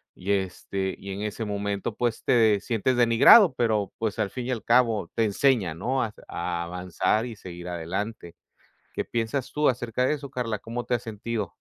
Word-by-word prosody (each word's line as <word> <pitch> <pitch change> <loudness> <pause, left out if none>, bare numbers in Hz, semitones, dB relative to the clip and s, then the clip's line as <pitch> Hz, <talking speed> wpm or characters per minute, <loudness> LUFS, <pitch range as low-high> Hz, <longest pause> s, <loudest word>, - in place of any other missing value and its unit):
y, 95 +3 -3
este, 95 0 -2
y 100 - -8
en 100 +2 -4
ese 105 +2 -3
momento, 100 +1 -3
pues, 120 -1 -1
te 110 -4 +4
sientes 120 +2 0
denigrado, 125 - +7
pero, 110 -4 0
pues, 110 -2 -2
al 100 - +1
fin 125 -1 -5
y - - -1
al 115 -5 -3
cabo 115 -7 +2
te 115 - +2
enseña, 105 - +2
¿no?, 125 +10 -1
a - - 0
s - - -17
a 85 -1 -3
avanzar 90 +5 -1
y 115 - -7
seguir 90 -3 -9
adelante, 85 +1 -4 0.6
¿qué - - -3
piensas 120 +3 -2
tú 150 -1 +3
acerca 120 0 -1
de 150 - +2
eso, 140 -1 -8
Karla? 115 -5 -3
¿Cómo 120 +2 -5
te - - -2
has 120 - -4
sentido? 110 -2 -4
110 Hz, 195 wpm, -26 LUFS, 95-120 Hz, 0.6 s, denigrado